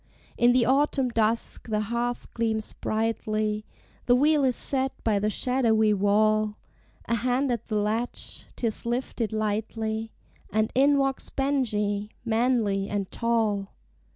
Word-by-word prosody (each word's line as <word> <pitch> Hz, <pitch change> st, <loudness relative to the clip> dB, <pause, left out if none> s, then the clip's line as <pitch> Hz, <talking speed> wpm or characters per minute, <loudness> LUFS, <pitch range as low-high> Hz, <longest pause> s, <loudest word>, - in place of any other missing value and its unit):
In 240 Hz, +1 st, +4 dB
the 245 Hz, -1 st, +3 dB
autumn 270 Hz, 0 st, +2 dB
dusk 225 Hz, 0 st, 0 dB
the 215 Hz, -1 st, +1 dB
hearth 235 Hz, +3 st, -3 dB
gleams 220 Hz, -2 st, -1 dB
brightly, 215 Hz, -1 st, -1 dB, 0.4 s
The 245 Hz, -, +6 dB
wheel 295 Hz, +2 st, +3 dB
is 255 Hz, -2 st, +2 dB
set 265 Hz, -1 st, 0 dB
by 215 Hz, -3 st, +2 dB
the 210 Hz, +1 st, 0 dB
shadowy 220 Hz, -3 st, +2 dB
wall, 210 Hz, +1 st, +2 dB, 0.5 s
A -, -, -1 dB
hand 250 Hz, +3 st, +1 dB
at 235 Hz, -3 st, -3 dB
the 215 Hz, -, -2 dB
latch, 215 Hz, +3 st, -2 dB
'tis 230 Hz, -3 st, -2 dB
lifted 240 Hz, -2 st, -2 dB
lightly, 220 Hz, +1 st, -2 dB, 0.4 s
And 215 Hz, 0 st, 0 dB
in 280 Hz, +2 st, +4 dB
walks 270 Hz, -1 st, 0 dB
Benjie, 210 Hz, -7 st, 0 dB, 0.2 s
manly 220 Hz, -4 st, +1 dB
and 200 Hz, -2 st, -3 dB
tall. 220 Hz, -4 st, 0 dB
225 Hz, 130 wpm, -26 LUFS, 215-245 Hz, 0.5 s, The